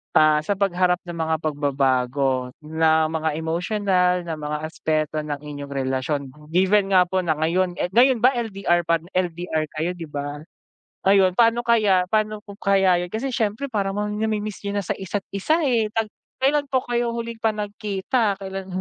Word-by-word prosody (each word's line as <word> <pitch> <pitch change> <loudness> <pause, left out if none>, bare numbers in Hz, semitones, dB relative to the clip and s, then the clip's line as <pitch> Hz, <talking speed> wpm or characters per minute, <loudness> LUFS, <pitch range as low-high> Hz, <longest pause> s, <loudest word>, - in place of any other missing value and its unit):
ah, 155 -1 +5
sa 175 +7 -1
pagharap 180 -2 +2
ng 175 -1 -7
mga 160 0 +1
pagbabago 135 -3 0
na 160 0 +2
mga 160 -1 -1
emotional 180 +2 +1
na 165 -2 -5
mga 150 0 -3
aspeto 155 -1 -1
ng 150 -1 -3
inyong 145 -1 -7
relasyon, 135 +1 -1 0.3
given 190 +3 +2
nga 180 - +7
po 185 +1 -1
na 170 -4 0
ngayon, 175 +4 0
eh, 180 - -2
ngayon 245 +2 +4
ba 255 - +7
LDR 195 -6 0
pad 165 -1 +2
LDR 175 -3 -1
kayo 160 +3 -1
'di 175 -2 -8
ba? 145 0 -5 0.7
Ayun 195 -2 +5
pano 235 0 +4
kaya 210 -6 +3
pano 215 0 0
po 200 - -10
kaya 190 -3 +3
yun 180 - -8
kasi 240 +5 -2
syempre 225 +3 -1
parang 195 -3 -1
ma 210 0 -1
namimiss 210 -1 -2
yun 200 - -2
na 200 - -5
sa - - -1
isa't 195 +1 -3
isa 310 - +1
eh 240 -6 +2
tag 225 -1 0 0.3
kailan 285 +2 +3
po 260 -2 +2
kayo 240 -1 0
huling 235 0 -5
pa 225 -1 +2
nagkita, 205 +1 -1
kailan? 195 0 -6
185 Hz, 175 wpm, -23 LUFS, 155-210 Hz, 0.7 s, nga